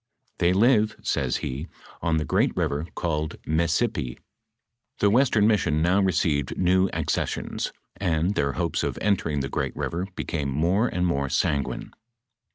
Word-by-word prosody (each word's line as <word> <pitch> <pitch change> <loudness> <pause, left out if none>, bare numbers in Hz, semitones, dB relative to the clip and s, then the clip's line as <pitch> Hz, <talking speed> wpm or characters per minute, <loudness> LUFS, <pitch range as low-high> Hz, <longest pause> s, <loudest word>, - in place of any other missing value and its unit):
" 130 - -44
They 85 0 +4
live," 110 +2 +3
says - - 0
he, 70 +6 -4 0.2
" - - -21
on 80 -2 +1
the 75 - -1
great - - +1
river 75 +3 -1
called 80 -3 -2
Messipi."* 80 - 0 0.8
The 100 - +3
western 120 -3 +4
mission 85 -8 +2
now 95 +4 +3
received 80 -7 +1
new 95 +1 +3
accessions, - - -2 0.3
and 85 0 +1
their 70 -7 0
hopes 85 -2 -1
of - - -2
entering 85 -8 0
the 70 - -2
great - - -2
river 90 +3 -3
became 75 -5 -2
more 85 - +2
and 90 -5 -1
more 70 -5 0
sanguine. 70 +1 -1
85 Hz, 155 wpm, -25 LUFS, 75-100 Hz, 0.8 s, They